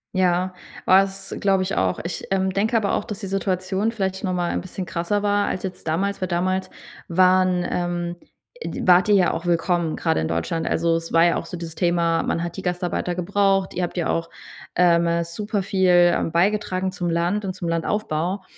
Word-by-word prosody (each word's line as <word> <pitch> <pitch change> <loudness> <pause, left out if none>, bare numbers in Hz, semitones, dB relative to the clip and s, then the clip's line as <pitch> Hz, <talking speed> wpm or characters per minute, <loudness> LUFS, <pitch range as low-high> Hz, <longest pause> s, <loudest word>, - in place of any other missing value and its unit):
Ja, 185 0 +1 0.3
war's 195 0 +2
glaub 195 -1 +2
ich 185 +1 -2
auch. 95 -1 0
Ich, 170 - -5
ähm, 190 0 +1
denke 215 +5 +1
aber 205 -3 0
auch, - - 0
dass 210 -4 -6
die - - -4
Situation 195 +2 -1
vielleicht 190 -3 -3
noch 185 - 0
mal 175 -1 -1
'n - - -2
bisschen 185 0 -6
krasser 175 +4 -2
war 205 0 +2
als 185 - -3
jetzt 185 -3 -6
damals. 195 +6 -1
Weil 185 - 0
damals 185 +2 -1 0.4
waren 185 0 +3
ähm, 175 0 -2 0.5
e - - -4
d - - -5
wart 180 +2 +5
ihr 205 - +6
ja 185 -3 +4
auch 170 +2 -4
willkommen 170 -1 +1
grade 160 - 0
in 80 - -1
Deutschland. 85 - -2
Also, 165 0 +1
es 165 0 -7
war 165 +1 +6
ja 170 - +3
auch - - -4
so 180 - -6
dieses 165 -1 -7
Thema: 170 -2 +1
Man 170 - -1
hat 170 +1 -5
die 190 - -4
Gastarbeiter 180 -1 -2
gebraucht, 195 +1 +1
ihr 180 - -2
habt 175 +1 -3
ja 170 - 0
auch 165 0 -1 0.5
ähm, 170 -1 +4
äh, 170 0 +1
super 205 +4 -3
viel, 190 -1 +1 0.3
ähm, - - -1
beigetragen 190 +1 +1
zum 175 -2 -3
Land 175 +5 0
und 190 -1 -3
zum 175 - -5
Landaufbau 170 +1 -1
180 Hz, 210 wpm, -23 LUFS, 170-195 Hz, 0.5 s, ihr